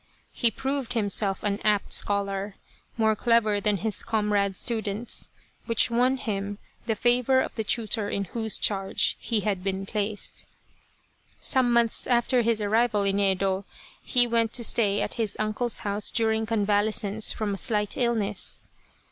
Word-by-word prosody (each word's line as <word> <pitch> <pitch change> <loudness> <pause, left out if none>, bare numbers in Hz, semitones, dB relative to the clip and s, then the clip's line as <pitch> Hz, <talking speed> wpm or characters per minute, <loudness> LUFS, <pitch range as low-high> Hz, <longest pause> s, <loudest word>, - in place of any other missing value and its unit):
He 235 - +2
proved 270 +1 -3
himself 205 -3 0
an 205 0 -1
apt 210 -2 +1
scholar, 200 0 0 0.4
more 220 -1 +2
clever 220 -2 +2
than 210 0 +1
his 215 +2 -2
comrade 205 -3 0
students, 220 -1 -2 0.4
which 230 0 +2
won 250 +3 +2
him 205 -4 -4 0.3
the 225 - +1
favour 245 +3 +2
of - - -2
the 220 - -3
tutor 215 -1 0
in 200 - -2
whose 220 +3 -1
charge 195 -2 +1
he 225 -3 -1
had 195 -3 -2
been 195 0 -2
placed. 205 0 -4 0.9
Some 255 -3 +2
months 235 -1 +2
after 245 0 +2
his 230 -1 +1
arrival 215 0 +2
in 200 0 +1
Yedo, 195 0 +1 0.4
he 245 -2 +3
went 230 -1 +1
to 240 - +2
stay 205 -3 +2
at - - -4
his 210 -2 -1
uncle's 215 +3 -1
house 205 0 0
during 220 -1 0
convalescence 210 0 +1
from 210 -2 -2
a - - -4
slight 210 -2 0
illness. 225 -5 0
215 Hz, 150 wpm, -26 LUFS, 200-235 Hz, 0.9 s, he